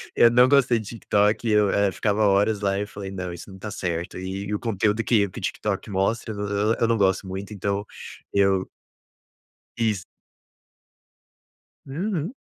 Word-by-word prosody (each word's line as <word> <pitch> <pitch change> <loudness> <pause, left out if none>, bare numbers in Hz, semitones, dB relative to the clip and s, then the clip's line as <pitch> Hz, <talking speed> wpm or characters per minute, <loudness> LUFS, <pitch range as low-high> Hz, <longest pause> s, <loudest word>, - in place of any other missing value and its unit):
Eu 120 - +7
não 125 +2 +6
gostei 135 -4 +4
de 110 - -8
TikTok, 105 0 +1
eu, 105 -1 +4
eh, 100 0 +2
ficava 105 +2 0
horas 100 +2 +3
lá 100 -1 +1
e - - -1
eu 105 - -3
falei: 100 -2 -7
"Não. 90 -2 -5
Isso 85 +3 -10
não 95 - -11
tá 105 +2 -6
certo". 90 -2 -3
E 95 +2 -5
e 105 - -3
o 105 - -1
conteúdo 110 -1 0
que 105 -4 +3
que - - -8
o - - -10
TikTok - - -3
mostra, 105 +3 -1
eu 100 - -8
não 105 +2 0
eu 115 - +4
não 115 - +2
gosto 95 -1 +2
muito, 95 +3 -6
então 100 +1 -2 0.5
eu 95 -1 +2 1.1
Isso. 110 -5 0 1.8
Uhum. 175 - -3
100 Hz, 180 wpm, -24 LUFS, 95-115 Hz, 1.8 s, Eu